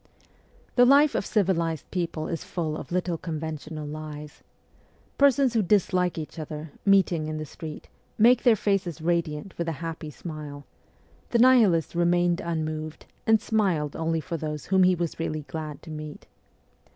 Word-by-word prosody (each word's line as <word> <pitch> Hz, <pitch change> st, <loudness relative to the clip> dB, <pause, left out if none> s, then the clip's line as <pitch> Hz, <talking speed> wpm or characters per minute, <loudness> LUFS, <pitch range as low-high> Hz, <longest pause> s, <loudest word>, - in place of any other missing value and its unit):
The 245 Hz, -, +8 dB
life 280 Hz, +4 st, +6 dB
of -, -, -1 dB
civilized 170 Hz, -7 st, 0 dB
people 170 Hz, -3 st, -2 dB
is 165 Hz, -, -4 dB
full 160 Hz, -4 st, -3 dB
of -, -, -8 dB
little 175 Hz, -2 st, -1 dB
conven 160 Hz, -2 st, -4 dB
tional 155 Hz, 0 st, -7 dB
lies. 150 Hz, -1 st, -8 dB, 0.8 s
Persons 275 Hz, -2 st, +4 dB
who 225 Hz, -, +3 dB
dislike 180 Hz, -2 st, +2 dB
each 160 Hz, +1 st, -6 dB
other, 155 Hz, 0 st, -6 dB, 0.2 s
meeting 185 Hz, -5 st, +3 dB
in 155 Hz, 0 st, -3 dB
the 155 Hz, -, -4 dB
street, 155 Hz, +1 st, -9 dB, 0.3 s
make 240 Hz, +3 st, +6 dB
their 240 Hz, -3 st, +5 dB
faces 195 Hz, -5 st, -1 dB
radiant 165 Hz, +1 st, -1 dB
with 170 Hz, -, -1 dB
a 165 Hz, -, -1 dB
happy 165 Hz, -1 st, -5 dB
smile; 150 Hz, -2 st, -8 dB, 0.6 s
the 235 Hz, -, +2 dB
Nihilist 230 Hz, -10 st, +5 dB
remained 175 Hz, 0 st, +2 dB
unmoved, 155 Hz, -2 st, -4 dB, 0.2 s
and 220 Hz, 0 st, +5 dB
smiled 185 Hz, -10 st, 0 dB
only 165 Hz, 0 st, -1 dB
for 170 Hz, +1 st, -4 dB
those 150 Hz, -1 st, -5 dB
whom 190 Hz, 0 st, +3 dB
he 185 Hz, 0 st, +5 dB
was 170 Hz, -2 st, -3 dB
really 155 Hz, -2 st, -2 dB
glad 155 Hz, 0 st, -7 dB
to 160 Hz, -, -9 dB
meet. 155 Hz, -1 st, -8 dB
165 Hz, 160 wpm, -26 LUFS, 155-190 Hz, 0.8 s, The